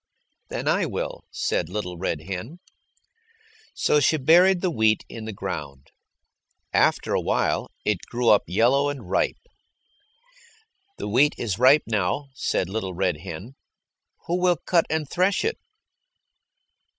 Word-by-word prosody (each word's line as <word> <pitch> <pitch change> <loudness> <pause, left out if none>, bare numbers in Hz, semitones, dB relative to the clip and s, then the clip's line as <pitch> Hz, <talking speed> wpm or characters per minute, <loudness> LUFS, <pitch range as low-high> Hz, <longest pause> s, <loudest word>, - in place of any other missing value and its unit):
"Then - - -4
I - - +2
will," - - -5
said 85 - -1
Little 90 -2 -4
Red 85 -3 -3
Hen. 100 - -6 1.2
So 150 - +3
she 155 +2 +3
buried 175 +6 +5
the 185 - 0
wheat 110 -4 +2
in 110 -1 -8
the 110 - -4
ground. 70 -8 -6 0.8
After - - +2
a - - +1
while - - 0 0.2
it 105 -4 -1
grew 120 0 0
up 105 - +5
yellow 125 - +3
and 145 -2 -6
ripe. - - +1 1.6
"The - - -5
wheat 130 +8 +3
is 105 -5 -3
ripe 135 +4 +6
now," 110 +6 -1
said 95 - -1
Little 95 -2 -4
Red 90 -3 0
Hen. 95 - -8 0.7
"Who 175 +2 -1
will 180 -2 +3
cut 170 +3 +1
and 160 -1 -1
thresh 185 - +1
it?" 450 +1 -1
115 Hz, 140 wpm, -24 LUFS, 95-150 Hz, 1.6 s, ripe